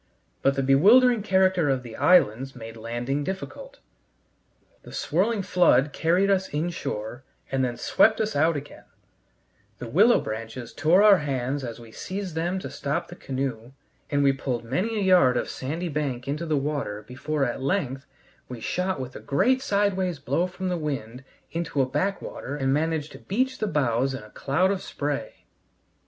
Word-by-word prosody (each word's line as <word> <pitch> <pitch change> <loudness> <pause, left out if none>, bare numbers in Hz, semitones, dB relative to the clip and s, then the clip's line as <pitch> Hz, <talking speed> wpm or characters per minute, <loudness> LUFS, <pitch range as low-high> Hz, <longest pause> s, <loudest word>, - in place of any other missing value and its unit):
But 135 0 +2
the 135 - 0
bewildering 215 - +6
character 190 -5 +2
of 130 -2 0
the 115 -2 -9
islands 135 -6 +3
made 115 -2 -9
landing 120 +5 -3
difficult; - - -6 1.0
the - - -13
swirling 200 +6 0
flood 150 -7 +3
carried 180 +5 +2
us 190 -1 +1
in 155 +4 -1
shore 120 -6 -5 0.3
and 135 -1 +1
then 120 -2 -2
swept 220 0 +3
us 220 -4 -1
out 155 +2 +3
again; 145 +1 -10 0.9
the 120 - -7
willow 205 - +5
branches 115 +2 -6
tore 165 +7 +4
our 205 -3 +7
hands 135 -1 -2
as 120 -2 -6
we 115 -1 -13
seized 190 - -5
them 170 +4 -1
to - - -6
stop 140 +1 -3
the 175 - -9
canoe, 130 -5 -4 0.4
and 145 -1 +1
we 135 -1 +4
pulled 130 -3 -3
many 185 - -1
a 205 - 0
yard 175 -10 +5
of - - -1
sandy 160 +7 -4
bank 140 -5 -3
into 150 +4 -3
the 155 -2 +1
water 140 -7 -3
before 135 +5 -2
at 120 +1 -3
length 140 -3 -1 0.4
we 125 -2 -7
shot 180 +6 -2
with 130 -1 -6
a - - -6
great 255 - +2
sideways 200 - 0
blow 145 +6 0
from 185 +1 -5
the 180 - -1
wind 135 -5 -4 0.3
into 165 -3 -3
a 135 - +4
backwater 165 -1 -3
and 135 -2 0
managed 155 0 -1
to - - -11
beach 260 +6 -1
the 215 - 0
bows 135 - +1
in 115 - -7
a 105 - -15
cloud 180 +8 +1
of 195 -2 -2
spray. 145 -1 -4
145 Hz, 175 wpm, -25 LUFS, 130-185 Hz, 1.0 s, our